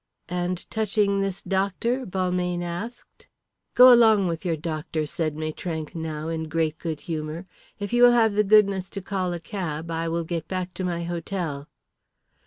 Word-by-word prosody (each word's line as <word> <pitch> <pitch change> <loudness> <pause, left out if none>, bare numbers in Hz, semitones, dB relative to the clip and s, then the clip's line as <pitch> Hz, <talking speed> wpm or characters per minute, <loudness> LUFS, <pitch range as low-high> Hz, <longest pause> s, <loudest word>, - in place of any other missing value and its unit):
"And 180 0 -2
touching 205 -2 +1
this 195 -1 -3
doctor?" 200 +7 -1
Balmayne 180 -1 -1
asked. 195 +8 -7 0.5
"Go 250 0 +10
along 220 -4 +6
with 165 -1 -2
your 170 -3 0
doctor," 155 0 -3
said 155 0 -2
Maitrank 155 +1 -4
now, 160 -2 -4
in 160 -1 -3
great 160 0 -1
good 160 -3 -4
humour. 160 +1 -4 0.3
"If 205 +2 -5
you 240 - +3
will 245 0 +9
have 225 -3 +4
the 210 +1 +3
goodness 200 -2 +4
to - - -2
call 185 -2 -2
a 175 - -3
cab 165 -3 -5
I 165 0 -1
will 170 +1 -1
get 165 -1 -4
back 185 -1 -3
to 185 - -5
my 170 -2 -2
hotel." 170 -4 -4
175 Hz, 170 wpm, -25 LUFS, 160-200 Hz, 0.5 s, Go